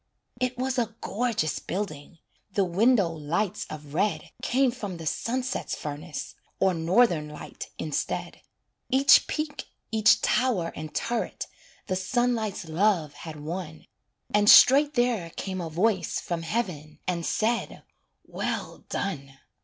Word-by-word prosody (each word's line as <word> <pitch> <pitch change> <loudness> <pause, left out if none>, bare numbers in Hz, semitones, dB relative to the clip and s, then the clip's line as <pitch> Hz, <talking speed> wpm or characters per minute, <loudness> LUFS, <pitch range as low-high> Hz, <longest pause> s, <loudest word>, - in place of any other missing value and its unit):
It 255 0 -1
was 260 0 0
a 225 -2 -2
gorgeous 220 -8 -1
building 170 -5 -5 0.4
The 200 - +3
window 200 +3 +3
lights 170 +6 -2
of 150 -2 -9
red 200 +6 0
Came 260 0 +2
from 205 -7 -6
the 165 - -8
sunset's 250 - -2
furnace, 150 +2 -6 0.3
Or 190 -1 +3
Northern 170 -1 +3
light 150 - -8
instead. 155 -2 -3 0.5
Each 270 +2 +6
peak, 305 -1 -3 0.3
each 220 0 +5
tower 225 -10 +1
and 155 0 -6
turret 235 0 -2 0.4
The 185 - -1
sunlight's 220 -1 0
love 165 -3 +1
had 155 +1 -9
won, 160 0 -6 0.5
And 205 0 +5
straight 285 +3 +8
there 240 -8 +1
came 185 +2 -5
a 165 - -4
voice 185 +2 +1
From 170 -1 -3
heaven 165 -5 -3
and 175 -2 -1
said 225 +7 -1 0.4
"well - - -4
done." 140 -8 -4
190 Hz, 130 wpm, -27 LUFS, 160-235 Hz, 0.5 s, straight